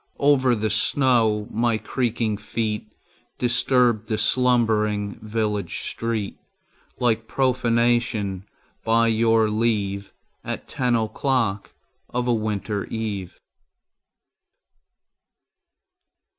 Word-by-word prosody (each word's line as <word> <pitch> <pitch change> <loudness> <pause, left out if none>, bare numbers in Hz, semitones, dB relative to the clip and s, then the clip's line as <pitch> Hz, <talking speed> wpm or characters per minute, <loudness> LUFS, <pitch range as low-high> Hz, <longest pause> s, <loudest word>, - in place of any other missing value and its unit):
Over 135 -3 +3
the 110 -1 -1
snow 110 -2 +2
my 115 0 +1
creaking 115 -2 -1
feet 110 0 -3 0.5
Disturbed 120 -2 +2
the 110 - -1
slumbering 105 -3 +1
village 105 -4 -2
street 115 -3 -3 0.6
Like 115 -2 +1
profanation, 115 -6 +1 0.4
by 115 +1 +3
your 115 0 +3
leave, 105 -3 -1 0.3
At - - -5
ten 125 -2 0
o'clock 110 -2 -1 0.3
of 125 0 -2
a 120 - +3
winter 105 -2 -2
eve. 105 -5 -5
110 Hz, 85 wpm, -23 LUFS, 105-120 Hz, 0.6 s, Over